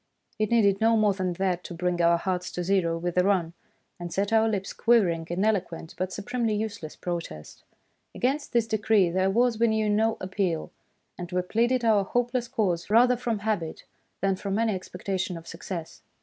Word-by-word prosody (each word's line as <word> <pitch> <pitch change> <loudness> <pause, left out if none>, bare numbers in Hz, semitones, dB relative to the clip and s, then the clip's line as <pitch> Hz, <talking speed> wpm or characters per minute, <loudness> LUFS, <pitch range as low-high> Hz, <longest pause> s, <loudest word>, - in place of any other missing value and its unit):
" - - -41
It 215 -1 +1
needed 205 -4 +3
no 225 0 +4
more 210 -2 +3
than 185 -2 -2
that 180 -1 -1
to 175 - -7
bring 175 0 -1
our 170 0 +4
hearts 180 0 -2
to 180 - -3
zero 175 -3 +1
with 175 +1 -3
a - - +4
run, 180 -4 +1 0.5
and 175 -1 -6
set 200 +4 -1
our 225 0 +4
lips 195 -3 -3
quivering 180 -9 +2
in 180 +4 0
eloquent 175 -6 -1
but 185 0 -3
supremely 225 +2 -2
useless 205 -7 -4
protest. 165 - -6 0.5
Against 275 +4 -1
this 235 -2 +2
decree 215 -4 +2
there 185 +2 +1
was, 235 +2 +2
we 235 - +4
knew, 220 -1 +1
no 220 +2 +2
appeal; 185 -3 -2 0.5
and 175 0 -6
we 180 0 0
pleaded 235 +5 +1
our 215 -3 +4
hopeless 245 +3 -1
cause 180 -7 -1
rather 245 +3 +5
from 235 -2 -2
habit 175 -8 -2 0.4
than 195 0 +2
from 195 +1 -3
any 225 -1 +1
expectation 185 0 -4
of 165 - -11
success. 165 -1 -7
195 Hz, 190 wpm, -26 LUFS, 175-220 Hz, 0.5 s, rather